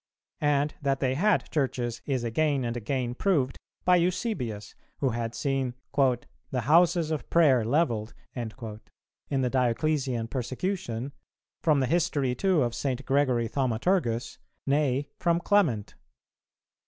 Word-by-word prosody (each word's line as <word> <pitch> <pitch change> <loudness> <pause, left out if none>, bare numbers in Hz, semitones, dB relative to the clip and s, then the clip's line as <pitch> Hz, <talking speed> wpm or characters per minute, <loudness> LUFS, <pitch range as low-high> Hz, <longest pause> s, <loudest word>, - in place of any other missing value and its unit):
And 145 0 +1
that 135 -2 0
they 130 -1 +1
had 205 +10 +2
churches 125 -5 -1
is 130 -4 0
again 140 +2 +1
and 120 0 -2
again 120 +1 -2
proved 135 -4 0 0.3
by 180 0 +6
Eusebius 170 - -2 0.2
who 135 - +1
had 115 0 -3
seen 135 -3 -1 0.2
"the 130 -1 0
houses 165 +4 +4
of 155 - -3
prayer 140 -8 +5
levelled" 115 -4 0 0.2
in 120 -3 -4 0.9
the 125 - +1
Dioclesian 130 -1 0
persecution; 130 - -3 0.5
from 150 -4 +3
the - - +2
history 145 -4 +1
too 180 0 +2
of 120 -1 -1
St. 130 0 -2
Gregory 130 -4 +2
Thaumaturgus, 120 - 0 0.3
nay 140 -1 +1
from 170 -1 +2
Clement. 170 - +1
135 Hz, 125 wpm, -27 LUFS, 120-155 Hz, 0.9 s, by